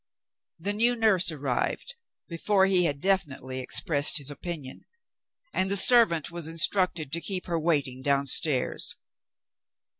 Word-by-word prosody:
The 200 Hz, +5 st, -3 dB
new 235 Hz, +4 st, +1 dB
nurse 215 Hz, -7 st, +3 dB
arrived, 145 Hz, -, -4 dB, 0.3 s
before 190 Hz, +3 st, 0 dB
he 185 Hz, -2 st, +2 dB
had 145 Hz, -3 st, -3 dB
definitely 135 Hz, -9 st, -2 dB
expressed 145 Hz, +3 st, +2 dB
his 145 Hz, -1 st, -5 dB
opinion; 145 Hz, -2 st, -8 dB, 0.7 s
and 190 Hz, -, -1 dB
the 200 Hz, -, +2 dB
servant 190 Hz, -, +4 dB
was 170 Hz, -2 st, -5 dB
instructed 165 Hz, -2 st, +1 dB
to 170 Hz, +1 st, -3 dB
keep 185 Hz, -1 st, -3 dB
her 170 Hz, -2 st, -3 dB
waiting 145 Hz, -6 st, -1 dB
downstairs. 140 Hz, 0 st, 0 dB
165 Hz, 125 wpm, -26 LUFS, 140-190 Hz, 0.7 s, servant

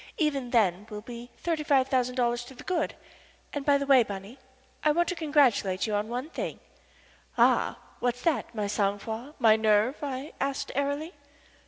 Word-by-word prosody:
Even 280 Hz, -6 st, 0 dB
then 210 Hz, -4 st, +2 dB
we'll 210 Hz, -1 st, -6 dB
be 235 Hz, +1 st, -9 dB
thirty 325 Hz, -3 st, -1 dB
five 275 Hz, -4 st, +3 dB
thousand 250 Hz, -2 st, +1 dB
dollars 240 Hz, -1 st, +1 dB
to 265 Hz, -, -12 dB
the -, -, -11 dB
good. 365 Hz, -2 st, -1 dB, 0.6 s
And, 290 Hz, -, -3 dB
by 285 Hz, 0 st, +4 dB
the 280 Hz, -, -2 dB
way, 270 Hz, -2 st, +7 dB
Bunny, 205 Hz, +3 st, -6 dB, 0.4 s
I 305 Hz, -, +5 dB
want 345 Hz, +2 st, +2 dB
to 360 Hz, -, -2 dB
congratulate 275 Hz, -, +2 dB
you 215 Hz, -, -2 dB
on 205 Hz, +1 st, 0 dB
one 250 Hz, +7 st, -4 dB
thing." -, -, -4 dB, 0.8 s
"Ah! -, -, +3 dB, 0.2 s
What's 245 Hz, 0 st, -1 dB
that 315 Hz, -7 st, 0 dB
my 210 Hz, -2 st, -1 dB
sang 200 Hz, 0 st, 0 dB
froid, 225 Hz, +8 st, -7 dB
my 225 Hz, -4 st, +6 dB
nerve?" 220 Hz, +4 st, +3 dB
I 275 Hz, 0 st, -4 dB
asked, 275 Hz, 0 st, -2 dB
airily. 285 Hz, +5 st, -2 dB
250 Hz, 180 wpm, -28 LUFS, 220-285 Hz, 0.8 s, way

